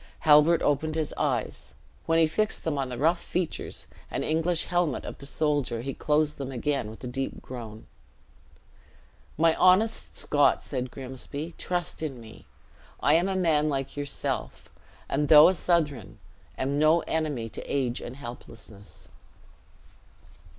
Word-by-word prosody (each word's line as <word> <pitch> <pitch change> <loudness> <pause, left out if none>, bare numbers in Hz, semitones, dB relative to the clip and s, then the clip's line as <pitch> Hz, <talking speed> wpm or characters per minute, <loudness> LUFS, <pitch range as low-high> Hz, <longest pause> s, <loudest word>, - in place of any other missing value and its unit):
Halbert 155 +2 +6
opened 155 +2 +1
his 160 -2 -2
eyes. - - -2 0.3
When 165 0 +3
he 165 - +6
fixed 215 +7 -1
them 160 -3 -1
on 135 -2 -2
the 125 - -5
rough 165 +6 +2
features 180 -2 -4 0.2
and - - -2
English 165 +2 0
helmet 175 -5 0
of - - -7
the 140 - -9
soldier, 145 -6 0
he 135 +2 -4
closed 150 0 0
them 135 -1 -4
again 130 -2 -1
with 110 - -12
a - - -4
deep 135 +2 -4
groan. 115 -4 -8 1.5
"My 165 +1 +4
honest 195 +5 +3
Scot," 145 -1 +2
said 130 -2 -4
Grimsby, 135 +5 -6
"trust 175 -2 -3
in 140 -6 -4
me. 110 -1 -13 0.5
I 145 - +3
am 175 +4 +3
a 190 - -1
man 155 -5 +2
like 135 -2 -3
yourself; 145 -1 -4 0.4
and 145 +2 0
though 150 +1 +9
a - - +2
Southron, 150 - 0 0.4
am 140 +2 -1
no 155 +2 +5
enemy 150 -9 -2
to - - -7
age 130 -4 0
and 120 - -7
helplessness." 115 -5 -10
150 Hz, 150 wpm, -27 LUFS, 130-160 Hz, 1.5 s, though